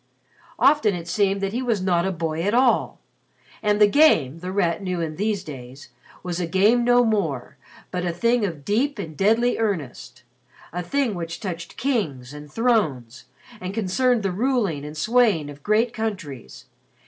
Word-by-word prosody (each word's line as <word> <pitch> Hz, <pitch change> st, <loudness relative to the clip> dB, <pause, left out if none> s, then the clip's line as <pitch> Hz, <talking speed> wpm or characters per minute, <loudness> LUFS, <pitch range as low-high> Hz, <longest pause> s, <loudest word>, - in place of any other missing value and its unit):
Often 275 Hz, -9 st, +4 dB
it 170 Hz, -1 st, -7 dB
seemed 195 Hz, +1 st, +1 dB
that 195 Hz, 0 st, -2 dB
he 245 Hz, -, -1 dB
was 235 Hz, -5 st, 0 dB
not 180 Hz, -1 st, +1 dB
a -, -, 0 dB
boy 165 Hz, -2 st, -3 dB
at 205 Hz, +6 st, 0 dB
all. 250 Hz, -1 st, +2 dB, 0.6 s
And 210 Hz, -1 st, +1 dB
the 210 Hz, -, +8 dB
Game, 205 Hz, -, +4 dB
The 180 Hz, +2 st, -5 dB
Rat 180 Hz, -2 st, 0 dB
knew 185 Hz, -2 st, -3 dB
in 160 Hz, -2 st, -3 dB
these 205 Hz, +1 st, -1 dB
days, 135 Hz, -3 st, -10 dB, 0.3 s
was 180 Hz, -1 st, -3 dB
a 175 Hz, -, -1 dB
game 205 Hz, +7 st, +3 dB
no 245 Hz, 0 st, +4 dB
more 165 Hz, -, -1 dB, 0.4 s
but 180 Hz, -1 st, -2 dB
a 175 Hz, -, 0 dB
thing 235 Hz, +7 st, +1 dB
of 165 Hz, -8 st, -4 dB
deep 255 Hz, +7 st, 0 dB
and 165 Hz, -6 st, -6 dB
deadly 225 Hz, +8 st, +2 dB
earnest 145 Hz, -, -3 dB, 0.5 s
a 180 Hz, -, -2 dB
thing 255 Hz, +5 st, 0 dB
which 170 Hz, -2 st, -5 dB
touched 170 Hz, -5 st, -6 dB
kings 155 Hz, -, -2 dB
and 150 Hz, 0 st, -10 dB
thrones, 155 Hz, -, 0 dB, 0.3 s
and 185 Hz, +2 st, -6 dB
concerned 225 Hz, +3 st, +1 dB
the 195 Hz, -, 0 dB
ruling 210 Hz, -, 0 dB
and 150 Hz, +1 st, -8 dB
swaying 210 Hz, -6 st, +2 dB
of 145 Hz, 0 st, -13 dB
great 220 Hz, +6 st, +1 dB
countries. 145 Hz, -, -6 dB
190 Hz, 170 wpm, -23 LUFS, 160-225 Hz, 0.6 s, the